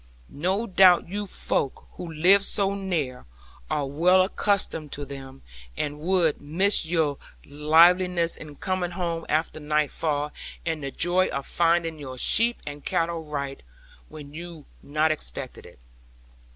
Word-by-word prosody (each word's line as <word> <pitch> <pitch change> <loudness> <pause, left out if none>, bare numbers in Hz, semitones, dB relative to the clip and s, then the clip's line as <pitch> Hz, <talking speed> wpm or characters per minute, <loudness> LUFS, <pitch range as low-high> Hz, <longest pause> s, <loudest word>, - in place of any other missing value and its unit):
No 190 +9 -1
doubt 185 -4 +5
you 205 +2 -4
folk, 140 -6 -3
who 170 -2 -8
live 185 +6 +5
so 200 -1 +2
near, 165 - -3 0.4
are 145 - 0
well 175 +7 +4
accustomed 190 -6 -1
to 145 - -5
them, 135 -1 -10 0.3
and 150 0 -3
would 170 -1 +1
miss 170 +5 +2
your 160 -4 0 0.3
liveliness 170 +4 +4
in 150 -2 -11
coming 185 +2 -2
home 170 -2 -3
after 155 0 0
nightfall, 150 0 -1 0.3
and 160 -2 -2
the 140 - -3
joy 175 +6 +1
of 140 0 -4
finding 165 -1 +1
your 130 -3 -8
sheep 230 - +3
and 145 0 -7
cattle 165 -1 -1
right, 140 -2 -5 0.5
when 145 -1 -11
you 170 -1 -9 0.2
not 155 +2 +1
expected 105 - -5
it. - - -17
160 Hz, 140 wpm, -25 LUFS, 145-180 Hz, 0.5 s, doubt